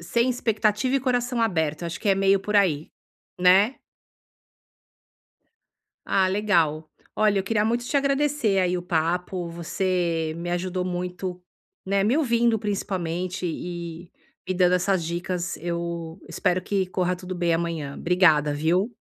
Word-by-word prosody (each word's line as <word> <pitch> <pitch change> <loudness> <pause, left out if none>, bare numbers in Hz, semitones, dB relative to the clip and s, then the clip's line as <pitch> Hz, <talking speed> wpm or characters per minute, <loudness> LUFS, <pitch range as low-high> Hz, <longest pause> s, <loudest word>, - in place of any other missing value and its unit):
Sem 235 +9 +1
expectativa 225 +1 +1
e - - 0
coração 245 -2 0
aberto, 160 -6 0
acho 170 - -5
que 210 - -1
é 195 - +5
meio 195 0 +3
por 210 +1 -1
aí, 160 -7 +2 0.5
né? 195 +7 +5 2.3
Ah, 190 -1 +2
legal. 170 -7 +1 0.3
Olha, 210 -2 +3
eu 190 - 0
queria 210 +1 +1
muito 240 +2 0
te 285 - -1
agradecer 275 -6 +1
aí, 180 -1 +1
o - - -6
papo. 175 +1 -1
Você 170 -1 -1
me 175 +1 -4
ajudou 180 +1 -2
muito, 180 0 -4 0.4
né, 195 +1 +1
me 240 +7 +2
ouvindo 235 -6 +2
principalmente 185 -3 -3
e 170 0 -6 0.4
me 185 - 0
dando 180 0 +4
essas 180 -1 +1
dicas. 175 +1 -3
Eu 170 0 -4
espero 185 -1 0
que 195 -1 0
corra 180 -1 -1
tudo 185 0 -7
bem 170 -1 +1
amanhã. 165 -4 -2
Obrigada, 160 -5 +3
viu? 175 +9 +1
180 Hz, 140 wpm, -25 LUFS, 170-205 Hz, 2.3 s, é